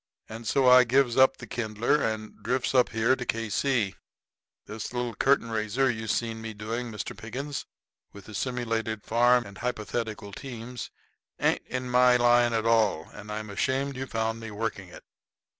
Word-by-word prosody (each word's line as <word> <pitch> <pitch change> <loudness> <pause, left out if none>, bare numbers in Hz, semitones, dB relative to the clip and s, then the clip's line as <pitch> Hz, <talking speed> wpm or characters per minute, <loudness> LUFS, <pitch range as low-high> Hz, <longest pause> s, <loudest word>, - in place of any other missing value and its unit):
And 115 +1 -8
so 135 +2 +3
I 125 0 +9
gives 125 0 +2
up 130 0 +5
the 120 - -9
kindler 115 +5 0
and 110 -1 -3
drifts 125 +4 -1
up 125 -2 +4
here 115 +4 +2
to 125 - -5
K.C. 115 -1 0 0.7
This 110 +2 -6
little 120 -1 -2
curtain 125 -1 +2
raiser 110 +4 +1
you 110 -1 -5
seen 115 0 -1
me 110 -1 -6
doing, 115 +3 -4
Mr. 105 -2 -5
Pickens, 135 +6 -5 0.4
with 100 -2 -13
the 110 - -11
simulated 115 -3 -2
farm 120 +1 +3
and 100 -1 -11
the - - -11
hypothetical 110 -3 -3
teams, 120 0 -7 0.5
ain't - - +2
in 130 0 -3
my 125 0 +5
line 120 0 +4
at 110 -1 0
all, 110 -8 +2
and 105 0 -9
I'm 105 0 -5
ashamed 135 +6 -1
you 130 +1 -4
found 115 -1 -2
me 115 0 -7
working 105 -3 -4
it." - - -12
115 Hz, 175 wpm, -27 LUFS, 110-125 Hz, 0.7 s, I